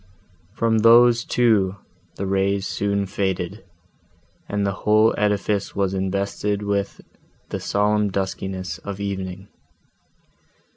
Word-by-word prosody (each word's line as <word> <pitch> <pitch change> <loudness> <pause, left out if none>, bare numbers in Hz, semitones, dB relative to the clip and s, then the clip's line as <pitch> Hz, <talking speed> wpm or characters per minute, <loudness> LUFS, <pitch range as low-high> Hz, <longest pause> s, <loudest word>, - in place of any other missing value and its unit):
From 115 -2 +2
those, 115 +1 +6
too, 105 -6 +2 0.4
the 100 - -4
rays 95 0 0
soon 100 -1 -1
faded, 95 0 -3 0.9
and 100 0 -1
the 100 - +1
whole 110 +1 +4
edifice 105 -1 0
was 95 -1 0
invested 100 +2 -2
with 100 -1 -2 0.5
the - - -3
solemn 105 0 +1
duskiness 95 -2 -4
of 100 -1 -7
evening. 95 -1 -5
100 Hz, 105 wpm, -22 LUFS, 95-105 Hz, 0.9 s, those